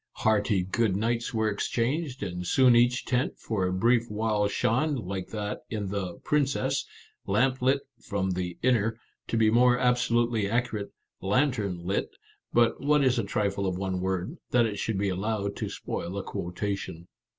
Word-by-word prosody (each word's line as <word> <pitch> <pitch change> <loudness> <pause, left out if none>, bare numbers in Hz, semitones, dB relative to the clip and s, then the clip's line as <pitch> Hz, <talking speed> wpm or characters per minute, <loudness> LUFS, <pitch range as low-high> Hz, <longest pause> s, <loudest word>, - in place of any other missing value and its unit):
Hearty 105 -3 +2
"good 100 +1 +1
nights" 115 +3 0
were 110 -1 +1
exchanged, 125 +6 -1
and 90 -2 -4
soon 130 +1 +5
each 120 +1 +3
tent 125 +1 0
for 100 -5 -1
a - - -1
brief 115 +5 +2
while 105 -1 +1
shone, 125 +8 +1
like 95 -5 -4
that 105 -1 -4
in 105 -3 -3
the 95 -3 -3
" - - -33
Princess," 140 -2 +1 0.2
" - - -32
lamp 125 +6 +2
lit 135 +2 +3 0.2
from 95 -2 -1
the 90 -1 -3
inner," 115 -3 +2
— - - -54
to 115 - -1
be 110 -1 +4
more 125 +1 +5
absolutely 120 -4 +2
accurate, 115 -3 -1 0.3
lantern 105 -3 +1
lit; 95 +2 -1 0.4
but 120 -1 +3
what 145 +1 +3
is 130 -2 +3
a - - 0
trifle 100 -2 -1
of 90 -1 -1
one 95 -1 -2
word, 95 - -2
that 120 -1 +4
it 105 -2 -3
should 110 -3 -1
be 100 0 0
allowed 100 +2 -2
to - - -3
spoil 90 +3 -5
a 100 - -3
quotation 90 -1 -4
110 Hz, 175 wpm, -28 LUFS, 100-125 Hz, 0.4 s, soon